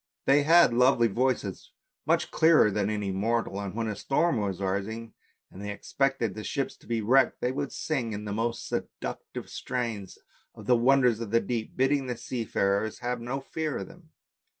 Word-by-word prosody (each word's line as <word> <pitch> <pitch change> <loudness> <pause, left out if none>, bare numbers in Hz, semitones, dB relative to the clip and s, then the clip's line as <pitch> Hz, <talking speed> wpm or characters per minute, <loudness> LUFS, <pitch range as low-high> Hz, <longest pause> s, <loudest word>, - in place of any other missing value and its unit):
They 140 +2 +5
had 165 -3 +6
lovely 125 -1 +4
voices, 130 - -1 0.3
much - - +2
clearer 160 -9 +5
than 100 0 0
any 105 -2 -2
mortal, 100 0 -1
and 100 0 -5
when 115 0 -1
a 105 - -2
storm 140 +7 +1
was 100 -3 -2
rising, 100 +4 -3 0.4
and 95 - -10
they 105 - -5
expected 110 -1 -1
ships 140 +4 -2
to - - -21
be 115 -1 -1
wrecked, 130 +5 +3
they 125 - 0
would 135 +1 -3
sing 130 -8 -2
in 105 0 -5
the 105 - -3
most 115 +2 -2
seduc - - -4
tive - - -6
strains 115 -6 -4 0.4
of - - -11
the 125 - +4
wonders 125 -1 +4
of 115 -3 -5
the 115 +2 +4
deep, 115 -2 -4
bidding 135 +1 +2
the 125 -2 -3
seafarers 110 -3 -1
have 120 -1 -2
no 130 +3 -3
fear 155 +2 -3
of - - -6
them. 175 -3 -17
115 Hz, 185 wpm, -28 LUFS, 105-135 Hz, 0.4 s, had